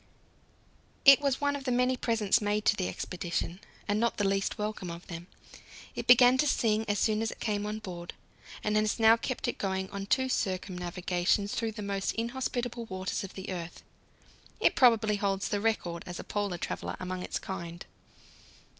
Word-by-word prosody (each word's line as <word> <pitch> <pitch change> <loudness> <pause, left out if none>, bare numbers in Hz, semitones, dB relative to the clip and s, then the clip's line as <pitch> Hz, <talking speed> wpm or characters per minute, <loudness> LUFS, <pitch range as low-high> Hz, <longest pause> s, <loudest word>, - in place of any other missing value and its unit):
It 275 0 +9
was 275 -2 +1
one 285 0 +1
of 275 -1 -6
the 255 - 0
many 250 +1 +2
presents 230 -2 +2
made 210 0 0
to 215 - +4
the 185 -3 -1
expedition, 175 0 -3 0.3
and 205 0 +1
not 235 +1 +1
the 205 - 0
least 195 0 0
welcome 210 -3 -3
of 170 +1 -8
them. 170 0 -8 0.7
It - - -5
began 245 +1 +7
to 300 - +3
sing 220 -5 +2
as 205 0 +1
soon 215 +1 +2
as 225 - 0
it - - -9
came 210 -2 -1
on 210 +1 -3
board, 175 -5 -7 0.5
and 210 0 0
has 215 0 +1
now 225 0 +7
kept 245 +2 -3
it 240 - -3
going 190 -1 -2
on 200 0 -5
two 260 +5 +2
circumnavigations 185 -1 -1
through 225 -1 -1
the 210 -1 -6
most 200 -1 -1
inhospitable 240 0 -3
waters 190 -2 -3
of 195 - -8
the 190 0 -6
earth. 175 -2 -6 0.8
It - - +4
probably 225 -5 +5
holds 200 -1 -1
the 205 -1 -1
record 180 -6 -1
as 175 -1 -6
a - - -5
Polar 205 -4 -2
traveller - - -4
among 185 0 -4
its - - -3
kind. 170 -2 -6
205 Hz, 185 wpm, -30 LUFS, 185-230 Hz, 0.8 s, It